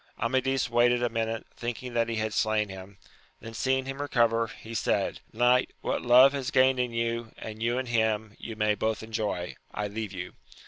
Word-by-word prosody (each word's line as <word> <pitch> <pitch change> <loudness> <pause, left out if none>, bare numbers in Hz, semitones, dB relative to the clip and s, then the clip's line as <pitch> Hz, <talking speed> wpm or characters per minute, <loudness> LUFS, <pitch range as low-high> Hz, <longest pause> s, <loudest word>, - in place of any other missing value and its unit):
Amadis 130 +1 +1
waited 120 +1 +3
a 120 - +2
minute, 115 -1 -2
thinking 120 +1 -5
that 115 -1 +1
he 115 - -1
had 110 -1 -2
slain 110 -1 +1
him; 95 +1 -10 0.4
then 115 - -9
seeing 130 +3 0
him 135 +1 -5
recover, 115 -5 +2
he 110 +1 -10
said, 115 - 0
Eoiight, 125 +2 +3
what - - -1
love 125 +3 +7
has 135 -2 -2
gained 130 -1 +4
in 125 -1 0
you, 115 0 -2
and 110 0 -8
you 120 +2 +1
in 130 - -1
him, 110 -2 0
you 115 - -7
may 105 -1 +2
both 110 +2 -1
enjoy: 105 -5 -3 0.2
I 105 0 -3
leave 105 0 -5
you. 90 -2 -6
115 Hz, 190 wpm, -28 LUFS, 110-125 Hz, 0.4 s, love